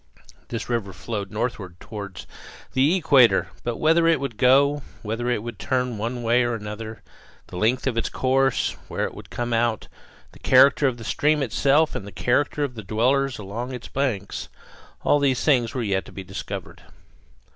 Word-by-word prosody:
This 115 -1 -5
river 115 -5 -2
flowed 100 +1 -5
northward 105 -5 -4
toward 100 -3 -8 0.5
the 140 +7 +3
equator, 140 -9 +4
but 120 -1 -2
whither 165 +1 +3
it 165 -3 +4
would 135 -4 -4
go, 140 +4 +4 0.2
whether 115 +3 -2
it 115 -4 0
would 120 -4 -7
turn 125 -4 -1
one 120 +3 -3
way 120 +2 +3
or 120 -1 0
another, 110 0 -7 0.5
the - - -9
length 115 +7 +1
of 135 -3 0
its - - -2
course, 135 0 +1 0.2
where - - -2
it - - -5
would - - -11
come 120 -1 -3
out, 115 -1 0 0.4
the - - -17
character 135 +2 +5
of 125 -2 -1
the 115 - -9
stream 150 +5 +1
itself, 140 +6 +2
and 100 - -5
the - - -8
character 145 +8 0
of 140 -3 -2
the 115 - -7
dwellers 125 +6 +1
along 115 +6 -5
its 125 - -9
banks 120 -8 -2 0.5
all 145 - +4
these 135 -3 +1
things 130 -3 +2
were 125 - -1
yet 95 -3 0
to - - -12
be 95 - -7
discovered. 95 +2 -7
120 Hz, 180 wpm, -24 LUFS, 110-135 Hz, 0.5 s, character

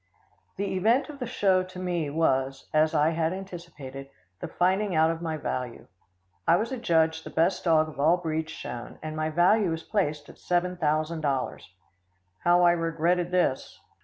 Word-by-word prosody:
The 200 0 -2
event 230 - +2
of 290 -2 -9
the 250 - -3
show 195 -6 +2
to 185 0 -9
me 175 -4 -2
was, 135 -3 0
as 155 +1 +3
I 150 +2 +3
had 165 +1 0
anticipated, 170 -8 -8 0.3
the - - -5
finding 190 +1 +1
out 160 +1 +4
of 165 0 -5
my 160 -2 -3
value. 125 -4 -4 0.6
I 170 - +6
was 220 +8 -1
adjudged 160 -9 +1
the - - -8
best 170 +4 +1
dog 160 -2 +4
of 155 - -11
all 160 +5 +4
breeds 160 -2 -3
shown, 120 -7 -7
and 155 0 -5
my 155 0 -1
value 180 +5 +3
was 165 0 -3
placed 150 -8 -1
at - - -15
seven 180 +1 0
thousand 155 0 0
dollars. 135 -8 -2 0.7
How 175 +1 +4
I 175 - +6
regretted 170 +1 0
this. 180 -7 0
165 Hz, 175 wpm, -27 LUFS, 155-180 Hz, 0.7 s, I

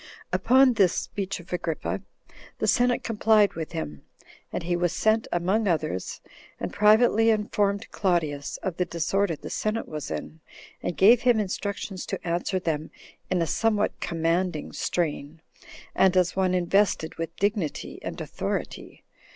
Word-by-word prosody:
2. - - +2
Upon 260 0 +5
this 195 -6 +3
speech 195 -1 -3
of 175 +1 -11
Agrippa, 170 +1 -2 0.6
the - - -1
senate 245 0 +2
complied 215 -2 +3
with 160 -2 -6
him, 75 -2 -5 0.5
and - - -3
he 175 +1 0
was 175 -1 +1
sent 220 +4 +2
among 190 +5 +1
others, 155 - -2 0.4
and - - -4
privately 220 +2 +5
informed 205 -1 +1
Claudius 160 -7 -1
of 185 -3 -3
the 180 - +1
disorder 170 +2 0
the - - -9
senate 215 +1 -2
was 150 -1 -6
in, 160 - -6 0.4
and 175 - -3
gave 225 +5 +6
him 245 -3 +4
instructions 200 -1 -4
to - - -5
answer 175 +3 0
them 160 -4 -2 0.4
in 180 -2 +1
a - - 0
somewhat 210 +4 0
commanding 165 0 -1
strain, 160 -2 -2 0.5
and 190 -1 +4
as 180 -1 +2
one 185 -1 +2
invested 180 -2 +1
with 165 0 -4
dignity 200 -6 -2
and - - -6
authority. - - -5
185 Hz, 150 wpm, -26 LUFS, 165-210 Hz, 0.6 s, gave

